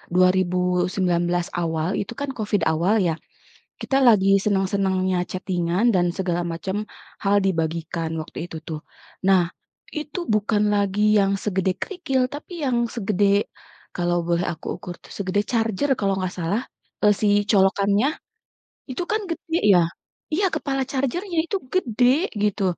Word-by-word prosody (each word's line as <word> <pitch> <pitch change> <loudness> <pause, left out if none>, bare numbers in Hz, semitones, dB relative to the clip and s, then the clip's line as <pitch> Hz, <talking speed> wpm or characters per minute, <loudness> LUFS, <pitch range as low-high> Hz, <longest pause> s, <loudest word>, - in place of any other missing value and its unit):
2019 180 -1 +2
awal, 165 0 -1
itu 200 - -6
kan 285 0 -3
COVID 210 -4 -1
awal 170 +7 +2
ya, 165 - +1 0.7
kita 270 - +1
lagi 195 -6 +5
seneng-senengnya 190 -2 +1
chatting-an 180 +1 -1
dan 180 -4 +2
segala 175 -2 -1
macam, 190 +5 -3 0.4
hal 200 0 +3
dibagikan 165 -2 -1
waktu 155 - -11
itu 165 - -7
tuh. 155 -2 -4 0.5
Nah, 185 -3 +4 0.4
itu 305 +2 -5
bukan 210 0 +2
lagi 200 0 +1 0.2
yang 195 0 +3
segede 190 -2 +1
kerikil 325 -9 -1
tapi 290 +5 -8
yang 250 -3 +1 0.2
segede 205 -3 +1 0.7
kalau 175 0 0
boleh 170 0 +1
aku 160 -2 -10
ukur 175 - -8
tuh - - -15
segede 200 0 0
charger 225 +3 0
kalau 195 -1 +1
nggak 185 -1 -2
salah, 180 +6 0 0.4
eee, 210 -1 +5
si 215 - +3 0.2
colokannya 200 +3 +3 0.8
itu 260 +7 -3
kan 430 0 +1
gede 330 0 -2 0.2
ya. 180 - +6 0.5
Iya 385 +6 +2
kepala 270 -1 -1
charger-nya 330 +8 -2
itu 395 - -1 0.2
gede, 250 - +2 0.4
gitu. 205 -1 +1
195 Hz, 135 wpm, -23 LUFS, 180-225 Hz, 0.8 s, ya